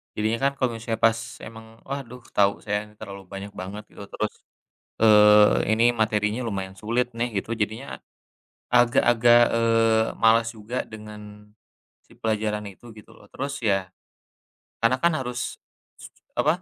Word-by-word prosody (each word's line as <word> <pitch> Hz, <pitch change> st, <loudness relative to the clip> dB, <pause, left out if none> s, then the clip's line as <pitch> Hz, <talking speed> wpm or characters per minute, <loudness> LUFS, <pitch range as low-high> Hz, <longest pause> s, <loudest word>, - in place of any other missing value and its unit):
Jadinya 110 Hz, +2 st, 0 dB
kan 140 Hz, -, +3 dB
kalo 130 Hz, -, +1 dB
misalnya 115 Hz, 0 st, -4 dB
pas 115 Hz, 0 st, +4 dB, 0.3 s
emang, 110 Hz, 0 st, -11 dB, 0.2 s
Waduh, 125 Hz, -3 st, -7 dB
tau 100 Hz, -1 st, +2 dB
saya 105 Hz, 0 st, -2 dB
ini 105 Hz, -, -19 dB
terlalu 100 Hz, -2 st, -9 dB
banyak 100 Hz, +1 st, -8 dB
banget 100 Hz, +3 st, -7 dB
gitu, -, -, -11 dB
terus, 110 Hz, -, -2 dB, 0.7 s
eee, 105 Hz, -1 st, +6 dB
ini 115 Hz, +2 st, +2 dB
materinya 110 Hz, 0 st, 0 dB
lumayan 95 Hz, -3 st, -4 dB
sulit 120 Hz, +3 st, -1 dB
nih 120 Hz, +1 st, 0 dB
gitu -, -, -14 dB
jadinya 110 Hz, +5 st, -4 dB, 0.7 s
agak-agak, 120 Hz, -1 st, +5 dB
eee, 115 Hz, -1 st, +3 dB, 0.2 s
malas 115 Hz, 0 st, +5 dB
juga 110 Hz, +4 st, -4 dB
dengan 105 Hz, -1 st, -12 dB, 0.5 s
si -, -, -21 dB
pelajaran 105 Hz, -1 st, -2 dB
itu, 120 Hz, +5 st, -15 dB
gitu 105 Hz, -, -15 dB
loh. -, -, -18 dB
Terus 140 Hz, +1 st, -4 dB
ya, 95 Hz, -3 st, 0 dB, 0.9 s
karena 115 Hz, +3 st, +3 dB
kan 170 Hz, -1 st, +4 dB
harus 125 Hz, -1 st, -4 dB, 0.4 s
s -, -, -9 dB, 0.3 s
apa, 175 Hz, +3 st, +1 dB
110 Hz, 145 wpm, -24 LUFS, 105-120 Hz, 0.9 s, eee